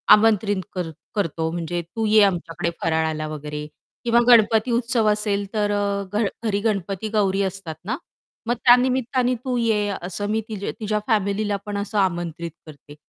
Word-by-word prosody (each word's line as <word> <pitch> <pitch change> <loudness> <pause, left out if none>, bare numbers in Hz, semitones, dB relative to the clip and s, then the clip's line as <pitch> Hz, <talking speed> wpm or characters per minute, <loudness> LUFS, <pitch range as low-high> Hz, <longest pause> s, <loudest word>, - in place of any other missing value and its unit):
आमंत्रित 210 -2 +2
कर 180 -3 -3 0.3
करतो 165 -4 -1
म्हणजे 175 0 -3
"तू 220 +7 -4
ये 215 0 +6
आमच्याकडे 175 -3 0
फराळाला" 160 -1 0
वगैरे 150 0 -5 0.4
किंवा 235 0 +4
गणपती 225 0 +5
उत्सव 235 -2 +1
असेल, 205 -1 0
तर 205 -1 +1
अ, 200 -1 0
घ 215 +1 +2 0.2
घरी 205 -2 +1
गणपती-गौरी 200 -1 0
असतात 190 -4 -4
ना, 250 +5 -2 0.5
मग 240 - +2
त्या 245 - +10
निमित्ताने 255 0 +1
"तू 255 -1 0
ये" 220 -3 +1
असं 190 +3 -4
मी 220 0 +1
ती 215 - -4
तिच्या 215 -1 -2
फॅमिलीला 205 -1 +1
पण 205 -1 -3
असं 205 +1 -3
आमंत्रित 170 -3 -1 0.2
करते. 145 -1 -13
205 Hz, 155 wpm, -23 LUFS, 175-220 Hz, 0.5 s, त्या